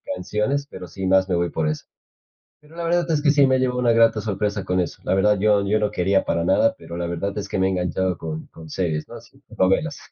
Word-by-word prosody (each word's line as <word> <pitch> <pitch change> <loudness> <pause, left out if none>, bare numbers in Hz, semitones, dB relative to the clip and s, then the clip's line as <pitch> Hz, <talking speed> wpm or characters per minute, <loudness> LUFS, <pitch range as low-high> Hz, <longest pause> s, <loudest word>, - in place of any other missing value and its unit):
canciones, 105 +10 -1
pero 90 - -9
sí 95 +3 -6
más 95 0 +3
me 90 - +1
voy 85 -1 0
por 80 -1 -1
eso. 75 - -4 0.8
Pero 150 +2 -18
la 170 - -5
verdad 170 0 +1
es 150 -2 +1
que 145 - +5
sí 145 -2 +5
me 130 0 +3
llevo 125 -1 0
una 120 -2 +3
grata 115 -1 +4
sorpresa 100 -1 -2
con 90 0 -1
eso, 90 - -3
la - - +1
verdad 105 +1 +3
yo 105 -1 +3
yo 105 +1 +2
no 105 -1 +1
quería 95 +2 +1
para 85 - 0
nada, 95 +5 +3
pero 85 +1 -9
la 85 0 -2
verdad 95 +4 -3
es 105 - -3
que - - -2
me 95 - +2
he - - +1
enganchado 90 0 -1
con 80 -1 -5
con 80 -1 -12
series, 80 -4 -2
¿no? - - -11
Así - - -15
con - - -15
novelas. 95 - +1
95 Hz, 260 wpm, -22 LUFS, 90-115 Hz, 0.8 s, que